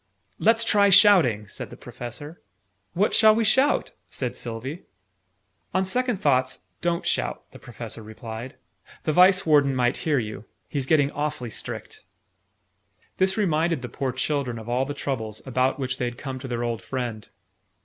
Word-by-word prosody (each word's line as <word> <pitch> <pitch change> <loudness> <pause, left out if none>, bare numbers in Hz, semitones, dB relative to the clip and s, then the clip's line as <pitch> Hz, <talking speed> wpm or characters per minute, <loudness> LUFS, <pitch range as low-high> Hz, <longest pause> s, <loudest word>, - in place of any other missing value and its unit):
"Lets 225 +2 +4
try 205 -3 +4
shouting," 180 - +6
said - - -7
the - - -11
Professor. 145 +7 -9 0.5
"What 200 +5 +1
shall 215 0 +7
we 230 - +2
shout?" 265 +7 +3 0.2
said 125 -3 -3
Sylvie. 125 +8 -5 0.9
"On 190 0 +2
second 250 +3 0
thoughts, 130 -4 +1 0.2
don't 170 -1 -1
shout," - - -1
the - - -13
Professor 115 -1 -8
replied. 110 +4 -8 0.5
"The 155 - 0
Vice 185 +3 +5
Warden 145 -4 +4
might 125 0 +1
hear 155 -3 0
you. 110 -3 -4 0.2
He's 140 -3 -3
getting 145 -2 +3
awfully 145 -5 -3
strict!" - - -7 1.1
This 190 +1 +2
reminded 165 -7 +1
the 125 - -5
poor 135 -2 -2
children 130 -1 -2
of 110 0 -9
all 125 +2 0
the 145 +1 -5
troubles, 110 -7 -4
about 130 0 +1
which 130 -2 -3
they 125 - 0
had 120 0 -4
come 135 -3 -6
to 130 - -7
their 120 -1 -2
old 115 -3 -2
friend. 120 -5 -5
135 Hz, 160 wpm, -25 LUFS, 120-175 Hz, 1.1 s, shall